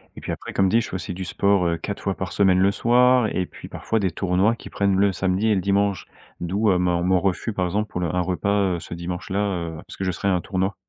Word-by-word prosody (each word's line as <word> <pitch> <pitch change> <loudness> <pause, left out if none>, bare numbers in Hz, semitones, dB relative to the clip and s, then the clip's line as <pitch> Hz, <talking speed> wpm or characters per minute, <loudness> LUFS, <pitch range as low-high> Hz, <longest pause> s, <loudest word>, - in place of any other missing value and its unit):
et - - -10
puis - - -4
après, - - -6
comme 95 -1 +3
dit, 115 - +4
je - - -6
fais - - -5
aussi 90 0 -4
du 95 +1 -5
sport, 100 -1 +2
heu, 85 0 0
4 100 +4 -5
fois 100 -1 -1
par 95 - -5
semaine 95 -2 +3
le 100 +1 +4
soir 125 +2 +4
et 95 - -1
puis - - -12
parfois 110 - -2
des 95 -3 0
tournois 95 +6 +1
qui - - -11
prennent 100 -1 +1
le 100 +1 +3
samedi 95 +3 0
et 105 - +3
le 95 - 0
dimanche. 100 0 +1 0.3
D'où, 100 +5 0
heu, 90 - +3
ma, 90 -1 +1
heu, - - -2
mon 95 0 +3
refus, 95 +4 -1
par 90 -3 -1
exemple, 105 +4 -2
pour 90 - -3
le 90 - 0
un 90 - +2
repas, 95 +1 0
heu, - - -4
ce 85 - -9
dimanche 85 +1 -5
là, 95 +1 -1
heu, 85 -5 -2
parce - - -10
que 95 - -3
je 95 - +1
serai 95 +3 -2
à 95 - +3
un 90 - 0
tournoi. 95 +1 -2
95 Hz, 290 wpm, -23 LUFS, 90-100 Hz, 0.3 s, dit